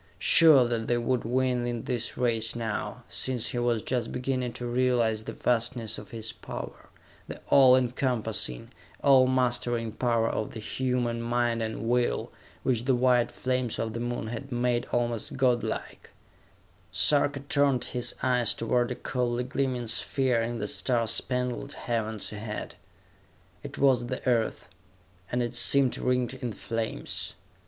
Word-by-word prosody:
Sure 155 -7 +6
that 115 -2 -2
they 120 - +2
would 120 +1 0
win 125 0 +1
in 120 -2 -3
this 120 -2 -3
race 115 -3 0
now, 115 -3 -4
since 125 -3 0
he 125 - -2
was 120 -2 +1
just 125 -3 -1
beginning 125 -1 -2
to 120 +1 -6
realize 120 -3 +1
the - - -4
vastness 115 -2 0
of 105 -2 -12
his 110 -1 -4
power - - -8 0.4
the - - -7
all 130 -2 +7
encompassing, 120 - -1 0.3
all 135 -2 +6
mastering 120 -3 0
power 115 0 +1
of 110 - -3
the - - -5
human 120 0 -1
mind 120 0 0
and 110 0 -3
will, 120 0 +1 0.3
which 120 -2 0
the 130 -1 +3
white 125 -1 +3
flames 125 -2 -1
of 110 -1 -2
the 115 - -4
Moon 120 -1 -3
had 120 +5 -6
made 120 0 0
almost 120 0 -1
god 125 -3 +2
like - - -5 0.8
Sarka 145 -1 +2
turned 140 -2 +2
his 125 -1 -2
eyes 125 -3 +2
toward 120 +1 +1
a 125 - -3
coldly 125 -1 -1
gleaming 130 -2 -2
sphere 125 +1 +1
in 115 +1 -2
the 105 -2 -3
star 115 +1 0
spangled 125 +4 -1
heavens 110 -3 -3
ahead. 105 0 -5 0.9
It - - -8
was 130 -3 +3
the 130 - -5
Earth, 115 -3 0 0.6
and 125 0 +1
it 120 0 -3
seemed 130 +2 +3
ringed 125 0 0
in 125 -3 -5
flames! 115 +2 -4
120 Hz, 150 wpm, -28 LUFS, 115-125 Hz, 0.9 s, all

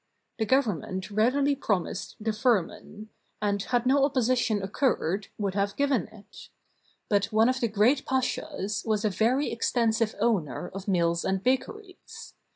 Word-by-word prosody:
The 220 - 0
Government 200 - 0
readily 265 +7 +2
promised 200 -8 -2
the 220 0 -1
firman; 215 -1 -1 0.3
and, 205 -1 0
had 245 +3 0
no 270 +2 +4
opposition 250 -6 +1
occurred, 195 - 0
would 200 -3 -2
have 200 0 -1
given 280 -8 +1
it. 215 -1 -15 0.6
But 205 -1 +2
one 220 +2 +3
of 260 0 0
the 235 - +1
great 225 +6 +2
pashas 210 -6 -2
was 215 -1 0
a 210 - +2
very 245 +9 +1
extensive 230 -1 0
owner 185 -7 0
of 195 +1 -7
mills 170 -3 +1
and 190 0 -1
bakeries. 370 +10 -4
220 Hz, 145 wpm, -27 LUFS, 200-255 Hz, 0.6 s, no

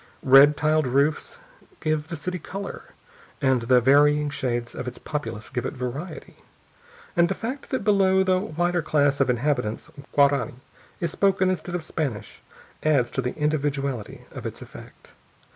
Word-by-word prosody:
Red 140 +2 +7
tiled 155 -1 +2
roofs 140 - 0 0.4
give 155 -1 -1
the 170 - -5
city 180 +3 -4
color, 195 +3 -7 0.5
and 130 -3 +2
the 125 +2 +4
varying 145 +3 +4
shades 120 -3 -3
of 125 - -6
its 125 - -6
populace 115 -8 -5
give 125 -2 -2
it 130 - -4
variety, 140 +7 -6 0.8
and 170 -1 +4
the - - -1
fact 255 +5 -6
that 260 - -2
below 190 -2 +4
the 185 -1 +2
whiter 175 -2 -1
class 145 -2 +1
of 135 - +2
inhabitants 125 -3 -1 0.2
Guarani 140 -3 +3 0.4
is 170 -2 -2
spoken 190 -1 +2
instead 180 -1 -4
of 175 - -3
Spanish 130 -11 -4 0.4
adds 140 -6 +2
to 135 - -1
the 125 0 -4
individuality 140 -5 -2
of - - -6
its - - -7
effect. - - -13
150 Hz, 155 wpm, -24 LUFS, 130-175 Hz, 0.8 s, Red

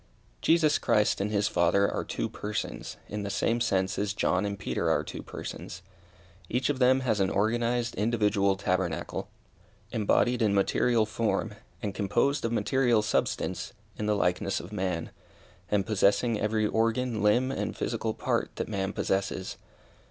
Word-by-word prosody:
Jesus 160 -2 +4
Christ 105 -1 +2
and 100 - 0
his 105 -1 +1
Father 95 +3 +3
are - - -2
two - - -3
persons, 105 0 -5
in 105 0 -4
the 100 - -3
same 115 +4 0
sense 95 -3 +1
as 105 0 -1
John 95 -1 +1
and 100 0 -4
Peter 65 -10 -1
are - - +2
two - - -7
persons. - - -8 0.7
Each 125 +4 0
of 135 - -5
them 130 +1 +4
has 110 -5 0
an 95 -1 +2
organized, 120 +3 0
individual 105 -2 +2
tabernacle, 90 -3 -2 0.6
embodied 120 +2 +2
in 105 -3 +3
material 110 +3 +2
form, 110 -1 -1 0.3
and 100 -2 -2
composed 120 +8 +1
of 115 - 0
material 120 0 +2
substance, 105 - -1 0.2
in 105 - -3
the 105 - +2
likeness 95 0 0
of 90 +5 -9
man, 90 -5 -2 0.6
and 100 -2 +1
possessing 110 +2 +2
every 110 0 +1
organ, 115 +1 0
limb, 120 +5 +3
and - - -3
physical - - -2
part - - 0
that - - -3
man 95 -2 -2
possesses. 95 -1 -1
105 Hz, 155 wpm, -28 LUFS, 100-115 Hz, 0.7 s, Jesus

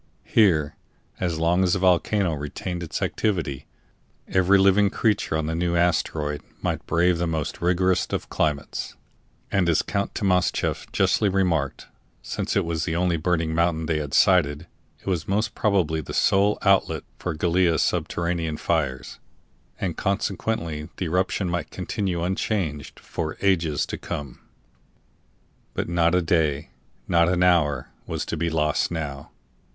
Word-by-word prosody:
Here, 80 -9 +3 0.4
as 85 -3 -1
long 85 +3 +2
as 90 -2 +2
the - - +2
volcano 90 0 +2
retained 80 +5 -5
its 80 -3 -3
activity, 80 -11 -1 0.6
every 95 +1 +4
living 100 +1 +4
creature 105 -7 0
on 80 - -1
the 80 - -2
new 85 +1 0
asteroid 80 -3 0 0.2
might - - -2
brave 85 +1 +2
the 85 - 0
most 80 -3 -3
rigorous 90 +1 +2
of - - -3
climates; 75 -2 -2 0.6
and 90 -3 +2
as 80 - +3
Count 100 0 -2
Timascheff 90 -3 0
justly 105 - +2
remarked, 90 -7 0 0.4
since - - -3
it - - +2
was 85 -1 -2
the 80 0 -2
only 90 0 +1
burning 80 0 0
mountain 80 -1 +1
they 80 -1 0
had 75 -2 -3
sighted, 80 -5 +3 0.4
it - - -24
was 90 -4 -1
most 110 +3 0
probably 90 -8 +1
the 70 - -7
sole 100 +2 +3
outlet 100 -1 +2 0.2
for 90 -3 -3
Gallia's 85 0 +2
subterranean 85 -2 -1
fires, 70 -8 -2 0.6
and 90 -5 -2
consequently 95 -5 -2
the 90 - -2
eruption 90 +3 0
might 85 -2 -2
continue 90 -5 -3
unchanged 90 -5 -2
for 80 -2 -5
ages 85 -7 +1
to - - -6
come. 70 -4 -6 1.4
But - - -2
not 85 0 +2
a 90 - +2
day, 80 -4 0 0.4
not 85 -1 +4
an 90 0 +2
hour, 75 -7 +2 0.2
was - - -3
to - - -3
be 85 +1 -1
lost 75 -2 +1
now. 75 -5 -5
85 Hz, 145 wpm, -24 LUFS, 80-95 Hz, 1.4 s, every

